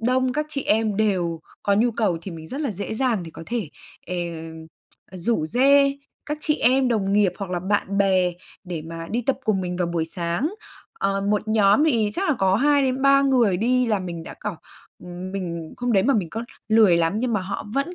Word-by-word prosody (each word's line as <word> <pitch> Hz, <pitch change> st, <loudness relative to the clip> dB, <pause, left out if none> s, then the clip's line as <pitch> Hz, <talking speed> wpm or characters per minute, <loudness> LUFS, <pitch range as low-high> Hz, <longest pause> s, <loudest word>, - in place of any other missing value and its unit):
đông 255 Hz, +2 st, +1 dB
các 300 Hz, +2 st, -1 dB
chị 280 Hz, -2 st, -3 dB
em 215 Hz, -1 st, +1 dB
đều 180 Hz, -6 st, 0 dB, 0.2 s
có 200 Hz, -, +2 dB
nhu 235 Hz, +4 st, +3 dB
cầu 210 Hz, -7 st, 0 dB
thì 190 Hz, -, -6 dB
mình 160 Hz, -1 st, -9 dB
rất 275 Hz, -, -5 dB
là 280 Hz, -6 st, -1 dB
dễ 200 Hz, +2 st, -5 dB
dàng 235 Hz, -5 st, 0 dB
để 165 Hz, -, -9 dB
có -, -, -8 dB
thể, 230 Hz, -9 st, -3 dB, 0.4 s
ờ, 180 Hz, -, -4 dB, 1.0 s
rủ 185 Hz, -2 st, -1 dB
rê 275 Hz, -, +4 dB, 0.3 s
các 300 Hz, 0 st, -3 dB
chị 300 Hz, -, +1 dB
em 255 Hz, +2 st, +3 dB
đồng 200 Hz, -4 st, 0 dB
nghiệp 205 Hz, -3 st, +3 dB
hoặc 195 Hz, -2 st, -5 dB
là 180 Hz, -, -1 dB
bạn 200 Hz, +1 st, -1 dB
bè 185 Hz, -2 st, +3 dB, 0.3 s
để 175 Hz, -4 st, -5 dB
mà 165 Hz, +1 st, -7 dB
đi 240 Hz, +3 st, -1 dB
tập 275 Hz, -, +2 dB
cùng 205 Hz, -3 st, +1 dB
mình 180 Hz, -1 st, -3 dB
vào 180 Hz, -, 0 dB
buổi 170 Hz, -1 st, -1 dB
sáng. 170 Hz, -, -2 dB, 0.4 s
Ờ, 195 Hz, 0 st, 0 dB
một 210 Hz, +2 st, 0 dB
nhóm 215 Hz, +6 st, +4 dB
thì 225 Hz, -8 st, +2 dB
chắc 385 Hz, +2 st, -1 dB
là 300 Hz, -, +3 dB
có 190 Hz, 0 st, +3 dB
2 285 Hz, +3 st, +3 dB
đến 260 Hz, 0 st, 0 dB
3 275 Hz, 0 st, +5 dB
người 245 Hz, -9 st, +3 dB
đi 250 Hz, +4 st, +2 dB
là 215 Hz, -3 st, +1 dB
mình 175 Hz, -3 st, -6 dB
đã -, -, -9 dB
kiểu 205 Hz, -5 st, -4 dB, 0.8 s
mình 170 Hz, -4 st, -5 dB
hôm 245 Hz, -1 st, -1 dB
đấy 195 Hz, -2 st, +4 dB
mà 275 Hz, +4 st, +3 dB
mình 180 Hz, -7 st, -1 dB
có 225 Hz, +1 st, -4 dB, 0.2 s
lười 215 Hz, -6 st, +5 dB
lắm 165 Hz, +1 st, +2 dB
nhưng 250 Hz, -2 st, 0 dB
mà 210 Hz, -, +1 dB
họ 195 Hz, +2 st, -5 dB
vẫn 280 Hz, +6 st, -1 dB
210 Hz, 220 wpm, -23 LUFS, 180-255 Hz, 1.0 s, 3